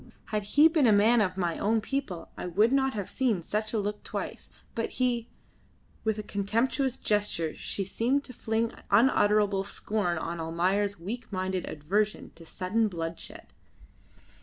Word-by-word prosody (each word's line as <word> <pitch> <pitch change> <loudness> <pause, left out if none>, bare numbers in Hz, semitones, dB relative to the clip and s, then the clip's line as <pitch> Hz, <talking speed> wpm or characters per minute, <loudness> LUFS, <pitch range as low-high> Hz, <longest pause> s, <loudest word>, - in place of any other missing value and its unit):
Had 215 -1 0 0.2
he 305 +2 +9
been 315 -5 +3
a - - +6
man 215 +3 +5
of 185 -2 0
my 175 -3 -1
own 220 +2 +2
people 220 -7 -4
I - - -5
would 210 +7 +3
not 270 -2 +2
have 200 -3 -3
seen 230 -10 0
such 215 +4 -2
a 225 - 0
look 210 +1 -3
twice; - - -5 0.2
but 230 - -2
he 240 -2 +1 0.4
" - - -34
With 220 -1 0
a 215 - -4
contemptuous 235 +7 0
gesture 205 -6 0
she 195 - -2
seemed 245 +8 +1
to 255 - -10
fling 225 0 -1 0.2
unutterable 205 -3 +4
scorn 200 -3 -2
on 170 +1 -4
Almayer's 185 +5 0
weak 225 +8 -6
minded 185 -1 -2
aversion 205 +8 -1
to 165 -1 -14
sudden 210 +6 0
bloodshed. 165 -3 -6
210 Hz, 160 wpm, -28 LUFS, 185-230 Hz, 0.4 s, he